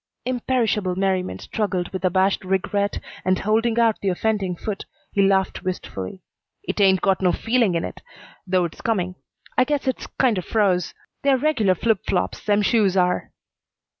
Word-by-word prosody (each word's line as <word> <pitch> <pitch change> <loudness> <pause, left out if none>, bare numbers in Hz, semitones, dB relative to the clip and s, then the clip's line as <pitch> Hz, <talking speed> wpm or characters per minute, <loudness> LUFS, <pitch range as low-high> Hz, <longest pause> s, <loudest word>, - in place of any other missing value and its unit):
Imperishable 235 -6 0
merriment 190 -1 -1
struggled 190 -5 -2
with 190 - -4
abashed 190 +2 +2
regret, 195 +2 0 0.3
and, 185 0 +2
holding 225 +3 +1
out 225 -2 +3
the 195 - +1
offending 195 -1 0
foot, 205 +3 -5 0.3
he 200 - +2
laughed 195 -1 +2
wistfully. 180 - -5 0.4
"It 280 - -2
ain't 190 -2 +5
got 195 -1 +2
no 180 -1 +4
feeling 230 -5 +1
in 165 - 0
it, - - -7 0.5
though 185 -1 +2
it's 165 - -8
coming. 185 -5 0 0.5
I - - +7
guess 290 +1 -1
it's 260 - -2
kinder 230 -8 +3
froze. 185 -3 +1 0.3
They're 275 -1 +3
regular 245 -10 +2
flip 225 +2 +1
flops, 95 - -1
them 205 0 +2
shoes 200 -3 +3
are." 180 -1 +1
195 Hz, 160 wpm, -23 LUFS, 185-225 Hz, 0.5 s, I